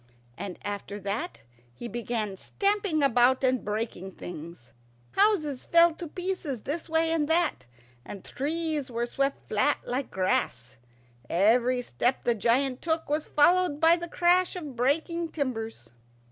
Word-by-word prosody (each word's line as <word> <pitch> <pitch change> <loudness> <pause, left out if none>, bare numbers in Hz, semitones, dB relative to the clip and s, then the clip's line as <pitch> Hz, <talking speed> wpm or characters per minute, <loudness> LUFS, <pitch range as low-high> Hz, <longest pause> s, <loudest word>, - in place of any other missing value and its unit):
And 185 +2 -6
after 205 0 -5
that 200 - -4 0.3
he 240 - -6
began 230 -4 -3
stamping 395 - 0
about 255 0 +4
and 255 -1 +2
breaking 210 -3 -4
things. 165 -9 -9 0.4
Houses 335 -10 +2
fell 335 0 +5
to 335 +1 -7
pieces 350 - -4
this 320 +4 -4
way 325 0 +2
and 315 -3 +1
that, 325 - +1 0.4
and 195 +6 -9
trees 305 0 -2
were 235 0 -1
swept 275 +3 -2
flat - - +2
like 255 +2 -2
grass. 125 -10 -1 0.5
Every 240 +7 +3
step 245 +1 -1
the 240 - +3
giant 250 +4 +1
took 320 -2 -1
was 300 +1 0
followed 350 0 +3
by 325 +1 +6
the 345 0 -6
crash 355 +2 +3
of 300 -7 -6
breaking 320 +7 0
timbers. 225 - -4
270 Hz, 140 wpm, -27 LUFS, 220-325 Hz, 0.5 s, by